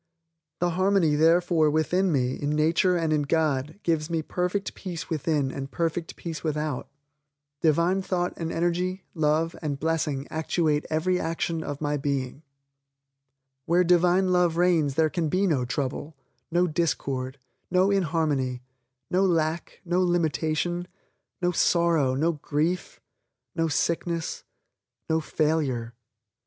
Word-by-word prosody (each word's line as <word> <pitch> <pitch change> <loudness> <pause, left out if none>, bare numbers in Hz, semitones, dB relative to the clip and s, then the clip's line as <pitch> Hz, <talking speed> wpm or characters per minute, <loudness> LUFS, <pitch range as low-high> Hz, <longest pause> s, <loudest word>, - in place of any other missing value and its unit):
The 175 0 +2
harmony 185 -2 +2
therefore 165 +1 +4
within 170 +5 +1
me 130 -3 +1
in 145 - -3
nature 165 +4 +3
and 165 -2 0
in 150 - +2
God 150 +1 0
gives 160 -2 0
me 165 -2 -1
perfect 180 +4 -2
peace 175 -5 -7
within 150 -3 0
and 135 0 -5
perfect 165 +2 -2
peace 165 -3 -6
without. 150 -3 -2 0.7
Divine 170 +4 +3
thought 180 -2 -1
and 165 -1 -4
energy, 180 +2 -1
love 160 +1 +1
and 145 -4 -3
blessing 155 -3 -1
actuate 155 -1 0
every 180 +4 +1
action 165 0 -2
of 145 0 -5
my 150 -1 0
being. 140 -1 -2 1.3
Where 175 +2 +4
Divine 180 +2 +3
Love 175 -2 +2
reigns 165 -6 +2
there 160 +1 +4
can 165 -4 -1
be 185 +5 +2
no 145 -9 +1
trouble, 140 +3 -3 0.3
no 175 +1 +2
discord, 140 -6 -1 0.3
no 185 +2 +3
inharmony, 155 -9 0 0.5
no 185 +2 +3
lack, 165 -3 0
no 180 +1 +1
limitation, 175 0 0 0.6
no 175 - +3
sorrow, 165 -6 +2
no 160 +5 +2
grief, 155 +3 -2 0.6
no 165 0 +1
sickness, 165 +2 -1 0.6
no 160 0 +2
failure. 150 -7 -1
160 Hz, 130 wpm, -26 LUFS, 150-175 Hz, 1.3 s, therefore